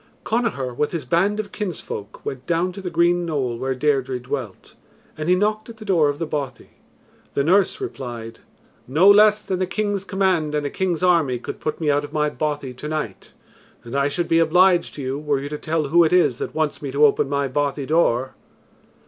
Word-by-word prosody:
Connachar 220 - -1
with 150 +6 -1
his 160 -6 -3
band 190 - +1
of 210 -2 -4
kinsfolk 175 - -6
went 130 -1 -6
down 175 +2 +1
to 195 - -9
the 185 - -4
green 175 +1 +2
knoll 135 -8 -2
where 130 0 -1
Deirdre 135 -2 0
dwelt 125 -5 -6 0.4
and 155 +2 -3
he 180 - +5
knocked 215 +3 0
at 225 - -10
the 215 - -10
door 170 -7 +3
of 145 - -2
the 165 - -2
bothy. 140 -5 -5 0.6
The 140 - +2
nurse 190 - +3
replied, 120 - -6 0.5
"No 155 +9 +4
less 210 +1 +6
than 190 -1 -2
a 185 - +1
king's 205 0 -1
command 185 -6 0
and 150 -1 -1
a 140 - -2
king's 185 -3 -1
army 165 -8 +3
could 120 - -7
put 155 - -3
me 155 -3 +1
out 145 +1 +1
of 145 - -9
my 150 -1 +1
bothy 145 -4 -3
to 130 +4 -7
night. 150 -11 -5 0.5
And 120 +3 -7
I 140 0 +2
should 170 +4 -2
be 165 - +3
obliged 175 +2 +3
to 145 - -6
you, 130 +2 -3
were 150 -2 0
you 140 +1 -5
to 150 0 -5
tell 155 -2 -1
who 170 +3 +6
it 160 - +1
is 170 -8 +3
that - - -5
wants 155 -2 -1
me 140 - -4
to 145 +2 +5
open 140 -1 +2
my 140 -1 0
bothy 140 +1 -1
door." 130 -5 +1
155 Hz, 215 wpm, -22 LUFS, 140-180 Hz, 0.6 s, less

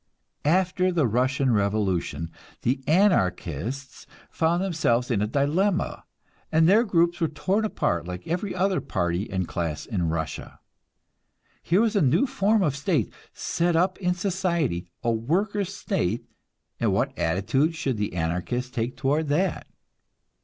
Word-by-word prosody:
After 185 +1 +2
the 165 -5 +2
Russian 130 +3 +1
revolution, 95 -6 0 0.3
the 130 +2 +1
Anarchists 130 - 0 0.2
found 170 +3 +1
themselves 130 -10 +1
in 105 -4 +1
a 105 - +1
dilemma, 160 - 0 0.5
and 160 +1 +4
their 210 +6 +6
groups 175 -4 +1
were 165 - +3
torn 190 +8 0
apart 85 - -1
like 90 0 -7
every 180 +4 -2
other 190 +1 +1
party 90 +1 -1
and 95 -3 -2
class 80 -4 -3
in 90 -8 -1
Russia. 80 -2 -4 1.0
Here 180 +5 +2
was 225 -1 +1
a 200 - +3
new 155 - +3
form 220 -5 +2
of 150 -5 +1
state 145 - 0 0.2
set 170 0 0
up 185 +3 +2
in 180 -2 0
society, 170 - -1 0.2
a 120 - +2
workers' 185 - 0
state, 115 - -1 0.5
and - - +2
what - - 0
attitude 115 - +1
should 135 -7 -2
the 105 -3 -2
Anarchists 90 +10 -2
take 120 +1 -3
toward 145 +4 +1
that? 165 +5 0
145 Hz, 140 wpm, -25 LUFS, -, 1.0 s, their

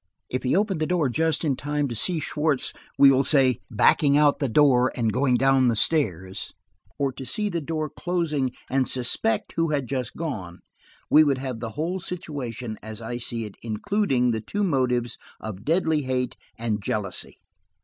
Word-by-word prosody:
If 130 - -2
he 130 - +1
opened 195 -5 0
the 155 - +1
door 170 -6 +1
just 160 +4 0
in 140 -3 +1
time 145 +1 -1
to 120 - -4
see 165 - 0
Schwartz, 150 -2 -1 0.2
we 140 -1 +8
will 135 0 +3
say, 130 -6 +4
backing 140 +6 +4
out 145 -1 +4
the 140 - 0
door 130 -1 +4
and 115 -4 0
going 125 -1 +2
down 135 -1 +4
the 115 - +2
stairs, 95 - -1 0.5
or 140 -2 0
to 130 - -8
see 210 - -1
the 170 -3 -2
door 155 +1 -2
closing 155 -5 -1 0.2
and 130 -1 +1
suspect 120 -3 0
who 165 0 +2
had 145 -3 0
just 130 -1 -4
gone, 100 - -5 0.5
we 155 - +8
would 140 -3 +2
have 130 -3 -4
the 115 -1 -4
whole 175 +5 -1
situation, 125 -11 -5
as 110 -1 -8
I 120 +1 -4
see 115 -1 -1
it, 105 - -9
including 125 - 0
the 110 -1 -2
two 205 - -2
motives 125 - 0 0.2
of 105 -3 -7
deadly 160 0 +2
hate 130 -2 -2 0.2
and 110 -3 -2
jealousy." 100 -1 -4
135 Hz, 180 wpm, -25 LUFS, 120-155 Hz, 0.5 s, we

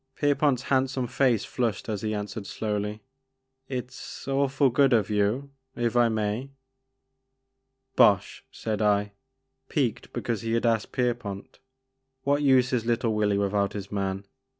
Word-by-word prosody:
" - - -50
Pierpont' 145 -3 +2
s - - -12
handsome 130 -1 +1
face 120 -3 +1
flushed 115 -7 -2
as 105 -3 -3
he 110 - -2
an 105 -1 -2
swered 105 -1 -7
slowly, 105 0 -3 0.6
"It's 130 +1 -6
awfully 135 -1 +2
good 135 +1 +4
of 110 -2 +2
you, 105 +7 0
— 130 - -48
if 115 - 0
I 120 -1 +5
may." 110 +4 -2 0.8
" 130 0 -52
Bosh," 100 -3 +4
said 110 -1 -3
I, 105 -1 +2 0.6
piqued 130 -7 -1
because 115 -4 -2
he 115 0 -2
had 115 +1 +1
asked 115 -2 +1
Pierpont, 120 -6 -3 0.6
"what 145 +1 +2
use 130 -3 +4
is 120 -3 +1
little 115 -1 +1
Willy 105 -1 +1
without 100 0 0
his 100 -1 -6
man?" 100 -1 -2
115 Hz, 155 wpm, -27 LUFS, 105-130 Hz, 0.8 s, I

